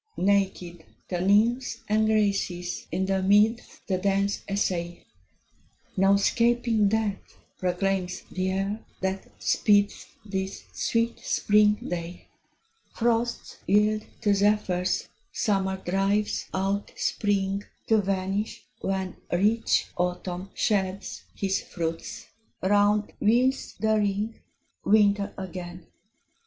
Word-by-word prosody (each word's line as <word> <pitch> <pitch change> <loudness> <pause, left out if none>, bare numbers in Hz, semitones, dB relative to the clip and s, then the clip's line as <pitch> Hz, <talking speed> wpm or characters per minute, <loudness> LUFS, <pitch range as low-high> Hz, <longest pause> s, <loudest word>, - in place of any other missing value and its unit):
Naked 190 -3 0 0.3
the 180 -2 -1
Nymphs 230 +5 +2
and 215 +1 +2
Graces 200 -5 0
in 190 - 0
the 190 0 0
meads 210 +4 +2
The 185 -2 0
dance 200 +1 +1
essay: 175 -3 -2 0.9
"No 195 0 +4
'scaping 230 0 +2
death" 215 -2 -2 0.2
proclaims 185 0 -1
the 185 - -4
year, 195 +3 -1 0.2
that 190 +1 -2
speeds 205 -1 +2 0.2
This 190 -1 -4
sweet 230 0 0
spring 210 0 +3
day. 175 0 -6 0.7
Frosts 235 0 0
yield 210 +2 +3 0.2
to 205 - +3
zephyrs; 195 -3 +1 0.2
Summer 190 -2 0
drives 195 +3 0
out 195 +2 -1
Spring, 200 -1 0 0.2
To 220 -1 +4
vanish, 195 +2 -2 0.2
when 190 -1 -2
Rich 210 +6 +2
Autumn 180 +1 -2
sheds 195 -2 -1
his 195 -1 0
fruits; 165 -2 -5 0.4
round 205 +2 +3
wheels 250 +5 +2
the 220 0 +2
ring, 210 +2 -1 0.4
Winter 205 -1 +3
again! 180 -1 -7
200 Hz, 100 wpm, -26 LUFS, 190-210 Hz, 0.9 s, No